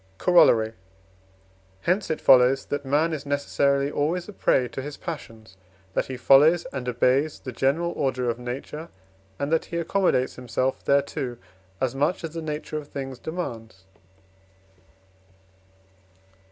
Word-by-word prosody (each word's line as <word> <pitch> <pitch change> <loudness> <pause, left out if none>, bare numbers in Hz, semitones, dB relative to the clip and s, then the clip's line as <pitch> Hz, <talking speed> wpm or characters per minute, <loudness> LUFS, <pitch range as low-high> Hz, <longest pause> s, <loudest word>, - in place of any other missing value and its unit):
Corollary. 120 - +4 1.1
Hence 185 - 0
it 160 - -1
follows, 130 +1 +5
that 145 0 -3
man 150 +4 +1
is 145 -3 -4
necessarily 140 0 +1
always 165 +5 -1
a 210 - -9
prey 125 -8 +2
to 135 - -5
his 145 +2 -7
passions, 110 - -8 0.4
that - - 0
he 130 - -5
follows 150 +7 +5
and 125 -2 -3
obeys 130 +5 +1
the 130 - -7
general 145 +8 0
order 130 -4 -1
of 120 0 -1
nature, 135 +6 -6 0.5
and 140 +2 -3
that 165 - +2
he 170 - -5
accommodates 170 -6 +1
himself 125 +1 -2
thereto, 140 -3 0 0.4
as 130 -2 0
much 145 +7 0
as 165 - -4
the 165 - -4
nature 155 0 -4
of 145 - -11
things 135 -3 -6
demands. 115 - -6
140 Hz, 140 wpm, -25 LUFS, 125-160 Hz, 1.1 s, follows